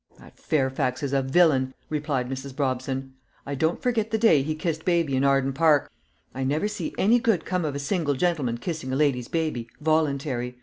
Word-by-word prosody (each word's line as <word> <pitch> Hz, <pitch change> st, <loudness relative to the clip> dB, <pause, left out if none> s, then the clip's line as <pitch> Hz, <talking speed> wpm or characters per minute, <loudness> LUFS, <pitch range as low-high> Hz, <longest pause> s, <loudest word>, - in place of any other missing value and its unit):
"That -, -, -17 dB
Fairfax 130 Hz, -1 st, 0 dB
is 140 Hz, -1 st, -2 dB
a 135 Hz, -, +3 dB
villain," 135 Hz, -2 st, +3 dB
replied 145 Hz, -4 st, -2 dB
Mrs. 135 Hz, +1 st, -6 dB
Brobson. 135 Hz, -1 st, -2 dB, 0.3 s
"I 140 Hz, -, -4 dB
don't 160 Hz, +5 st, 0 dB
forget 230 Hz, -3 st, 0 dB
the 220 Hz, -, 0 dB
day 220 Hz, -11 st, +5 dB
he 155 Hz, +3 st, -2 dB
kissed 160 Hz, 0 st, -3 dB
baby 170 Hz, -6 st, +1 dB
in 130 Hz, -, +1 dB
Arden 135 Hz, -1 st, +2 dB
Park. 150 Hz, 0 st, +3 dB, 0.4 s
I 135 Hz, -, -3 dB
never 150 Hz, +9 st, 0 dB
see 210 Hz, 0 st, -5 dB
any 230 Hz, +5 st, +4 dB
good 220 Hz, -8 st, +1 dB
come 180 Hz, -2 st, -1 dB
of 145 Hz, -2 st, -2 dB
a -, -, -1 dB
single 145 Hz, 0 st, -1 dB
gentleman 140 Hz, -7 st, 0 dB
kissing 155 Hz, 0 st, -4 dB
a -, -, 0 dB
lady's 135 Hz, -4 st, +1 dB
baby, 155 Hz, -8 st, -2 dB
voluntary. 140 Hz, -5 st, 0 dB
145 Hz, 190 wpm, -25 LUFS, 130-160 Hz, 0.4 s, day